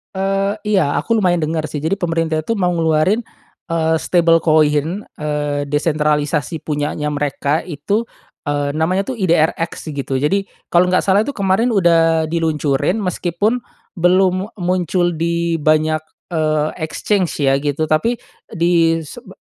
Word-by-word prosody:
Eee, 195 +2 0
iya 190 -9 +2
aku 230 - 0
lumayan 180 -2 +3
denger 155 -1 -2
sih 150 - -4
jadi 160 +6 -1
pemerintah 165 -4 -1
itu 230 +8 -2
mau 180 -2 +1
ngeluarin, 165 +6 +2 0.5
eee, 160 -1 +1
stable 165 -2 +3
coin, 155 +4 +2
eee, 145 -1 -3
desentralisasi 150 +1 0
punyanya 150 0 -2
mereka 145 +1 -1
itu, 190 +9 -2 0.4
eee, 145 -1 -1
namanya 180 +6 0
tuh 260 - -3
IDRX 165 -5 0
gitu, 135 -1 -2
jadi 195 +9 0 0.2
kalau 180 +1 +4
nggak 185 - +2
salah 200 +1 +4
tuh 275 +6 -4
kemarin 200 +4 +2
udah 165 -6 +3
diluncurin 155 0 0
meskipun 200 +4 -1 0.3
belum 185 +2 +2
muncul 180 -1 0
di 170 0 -1
banyak, 155 +1 +2 0.3
eee, 155 -1 +1
exchange 165 -1 -1
ya 135 +1 +2
gitu 145 +2 -1
tapi 155 +11 +1 0.3
di 165 -1 +2
sebe - - -12
165 Hz, 135 wpm, -18 LUFS, 150-185 Hz, 0.5 s, kalau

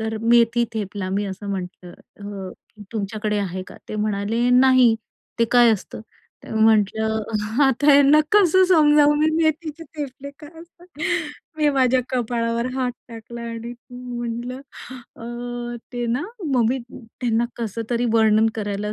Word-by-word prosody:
तर 220 0 -3
मेथी 235 0 +4
थेपला 200 -3 -4
मी 200 +2 -1
असं 195 +1 -7
म्हटलं 180 -2 -6
अ, 200 -2 -9 0.4
"तुमच्याकडे 210 0 -2
आहे 185 -2 -3
का? - - -12
ते 215 - -5
म्हणाले 215 +3 0
नाही 255 -2 +5 0.4
ते 230 - +4
काय 240 -1 +6
असतं?" 210 - -5 0.4
तर - - -7
म्हंटलं 220 0 +2 0.4
आता 270 +1 +2
ह्यांना 285 +1 +6
कसं 375 -3 +5
समजावू 300 -4 +5
मी 310 - +4 0.2
मेथीचे 315 0 -2
थेपले 280 -1 -6
काय 295 -1 -11
असतात? 345 +1 -17 0.7
मी 300 -1 +3
माझ्या 260 -2 +3
कपाळावर 235 -1 -1
हात 255 -1 -1 0.2
टाकला 235 0 -9
आणि 230 +1 -6 0.2
म्हटलं 245 0 -5 0.3
अ, 240 0 -7 0.2
ते 245 0 -3
ना 240 +4 -1 0.3
मग 245 -3 +3
मी 260 +3 0 0.4
त्यांना 235 -2 +1
कसं 230 -1 -4
तरी 240 0 0
वर्णन 220 -1 +4
करायला 205 -1 -3
235 Hz, 140 wpm, -22 LUFS, 215-255 Hz, 0.7 s, काय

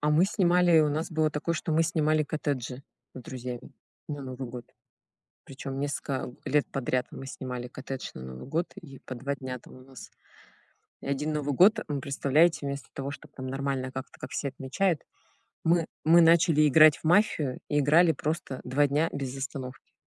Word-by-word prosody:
А 150 0 +1
мы 160 +5 +5
снимали, 180 -3 +3
и - - +8
у 155 - +3
нас 155 +4 -2
было 155 -1 +1
такое, 150 +3 -2
что 160 0 -2
мы 160 +1 +4
снимали 155 -2 +2
коттеджи 140 -3 -3 0.3
с 130 - -7
друзьями 125 -1 -7 0.4
на 145 -2 -4
Новый 130 -1 -6
год. 120 0 -8 0.8
Причем 135 0 -6
несколько, 140 -1 -2
а, 125 - -8
лет 145 +1 +2
подряд 130 -2 -1
мы 135 - -8
снимали 125 -2 -6
коттедж 130 0 -6
на 65 - -8
Новый 65 - -8
год, 165 +4 -1
и 140 -9 -11
по 130 - -7
2 140 +3 -3
дня 130 -1 -5
там - - -16
у - - -13
нас. 130 0 -12 0.9
И - - -9
один 145 +3 -1
Новый 145 -1 -1
год, 210 - +6
эм, 145 -2 -2
представляете, 140 +4 +2
вместо 140 0 -5
того, 140 0 -4
чтоб - - -11
там 130 -1 -7
нормально 135 -1 -2
как-то, 130 -1 -7
как - - -8
все 140 - -2
отмечают, 140 +5 -1 0.6
мы 165 0 +3 0.2
мы 165 +2 +7
начали 165 -2 +5
играть 155 +1 +7
в - - -23
мафию 155 -6 +2
и 145 - +2
играли 160 +4 +5
просто 150 -3 -3
2 145 +3 +2
дня 150 +4 +1
без 135 -1 -4
остановки. 135 -1 -7
140 Hz, 190 wpm, -28 LUFS, 130-155 Hz, 0.9 s, и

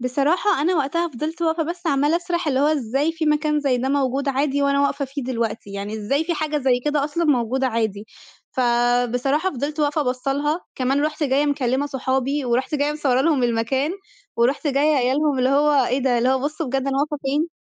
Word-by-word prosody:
بصراحة 285 +8 +1
أنا 360 +4 +2
وقتها 330 +4 0
فضلت 315 +4 -5
واقفة 325 0 +1
بس 345 +2 -5
عمّالة 290 +1 +2
أسرح 345 -1 -2
اللي 265 -2 +1
هو 285 - +3
إزاي 285 +1 0
في 325 -1 -3
مكان 300 0 +1
زي 275 -3 +1
ده 260 +2 -1
موجود 275 0 0
عادي 280 +1 0
وأنا 280 0 +2
واقفة 280 0 0
فيه 275 +1 -6
دلوقتي! 230 -4 -3
يعني 200 +2 -5
إزاي 275 +9 -1
في 340 +1 -1
حاجة 305 -1 -1
زي 255 -3 +1
كده 295 -1 +1
أصلًا 310 +3 -1
موجودة 260 -2 +1
عادي؟ 220 -4 -2 0.5
فبصراحة 245 +5 +1
فضلت 295 +2 -4
واقفة 295 +1 +1
باصة 255 +1 -1
لها، 295 +4 -1
كمان 270 +3 0
رُحت 310 +1 -3
جايّة 280 +1 +2
مكلمة 275 -1 0
صحابي، 265 +1 -1
ورُحت 250 +5 0
جايّة 290 0 +1
مصورة 275 -4 +1
لهم 285 -3 +2
المكان، 240 +5 0 0.5
ورُحت 250 +6 +1
جايّة 290 +2 +2
قايلة 260 +2 +1
لهم 295 -3 +1
اللي 255 0 +2
هو 285 -1 +3
إيه 255 +3 0
ده، 255 -3 +1
اللي 245 +2 +2
هو 265 0 +2
بصوا 305 +3 -3
بجد 270 +1 -1
أنا 270 0 0
واقفة 295 +1 -1
فين! 295 +5 0
280 Hz, 205 wpm, -22 LUFS, 255-300 Hz, 0.5 s, هو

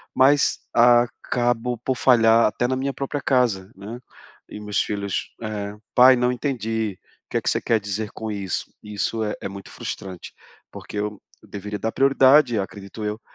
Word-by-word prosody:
mas 140 +2 +4
acabo 120 0 +2
por 130 +1 -1
falhar 115 -3 +5
até 120 +3 -1
na 130 - 0
minha 135 +1 -2
própria 140 +1 -4
casa, 115 -8 +1
né. 105 +5 -8 0.5
E 105 - -8
meus 105 -1 -2
filhos, 100 -2 -3
eh, 105 -2 -4 0.2
"Pai, 130 +1 +8
não 125 0 +1
entendi. 110 -6 -2 0.3
O - - -74
que - - 0
é - - 0
que - - 0
você - - +1
quer 115 -2 +2
dizer 105 +1 -4
com 110 -1 -5
isso?". 100 -4 -3
Isso 105 +2 -2
é 105 - -2
é - - -4
muito 100 0 -10
frustrante, 95 -3 -7 0.4
porque - - -9
eu 105 0 -3 0.2
eu - - -18
deveria 105 +1 -5
dar 110 - -2
prioridade, 135 -2 +5
acredito 100 +2 -7
eu, 105 +1 -3
110 Hz, 175 wpm, -23 LUFS, 105-125 Hz, 0.5 s, Pai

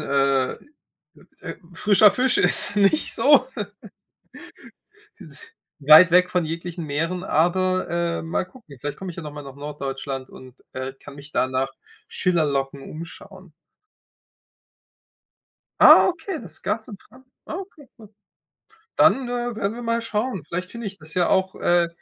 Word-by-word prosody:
äh, 135 -2 +1 1.2
frischer 210 +2 +5
Fisch 255 0 +1
ist 205 - +4
nicht 205 +10 +2
so. 270 -2 +4 1.7
Ist 455 0 -13 0.3
weit 155 +5 +8
weg 180 +1 +4
von 180 -2 0
jeglichen 165 +1 -5
Meeren, 165 +5 -2
aber, 185 +4 +1
ähm, 170 -1 -2
mal 180 - -1
gucken. 185 - -16
Vielleicht 145 +2 -5
komme 190 -1 -6
ich - - -11
ja 175 - -7
noch 150 -1 -8
mal 145 0 -8
nach 135 -1 -11
Norddeutschland 135 -2 -6
und, 130 0 -15
äh, 130 +1 -5
kann 140 - -13
mich 145 +1 -13
da - - +1
nach 130 +1 -1 0.4
Schillerlocken 140 -6 -1
umschauen. 180 +4 -11 2.3
Ah, - - +9
okay, 365 +2 -4
das 175 -9 -12
gab's 220 +3 -3
in 210 -5 -9
Tran 255 +6 -20 0.2
Ah, - - -6
okay, 360 -6 -10
gut. 215 -2 -16 0.8
Dann, 260 -2 +4
äh, 245 -1 -3
werden 205 -1 -2
wir 240 - -8
mal 230 0 -1
schauen. 220 - -3
Vielleicht 180 +2 -5
finde 235 -2 -6
ich 195 0 -8
das 155 -3 -11
ja 180 -1 +1
auch, 190 0 +1
äh 175 -1 +2
180 Hz, 145 wpm, -23 LUFS, 150-220 Hz, 2.3 s, Ah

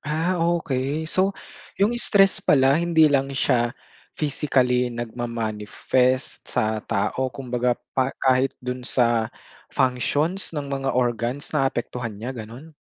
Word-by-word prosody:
Ah, 165 +4 -1
okey. 155 -3 0
So, 190 +5 0 0.4
yung 205 +4 +2
stress 195 -4 +4
pala 135 +3 +4
hindi 165 -2 +4
lang 135 0 +2
siya 120 -2 +1 0.4
physically 130 -4 +1
nagma-manifest 120 +2 -1
sa 110 0 0
tao 130 +6 -1
kumbaga 125 -2 -1 0.2
pa 130 -1 +3 0.2
kahit 130 0 +3
dun 125 0 -3
sa 115 -3 +2 0.4
functions 145 +9 0
ng 145 -1 -3
mga 135 -1 -1
organs 120 +2 -1
naapektuhan 125 -6 -2
niya, 125 +4 -5
ganun? 125 +7 -10
130 Hz, 115 wpm, -23 LUFS, 120-150 Hz, 0.4 s, stress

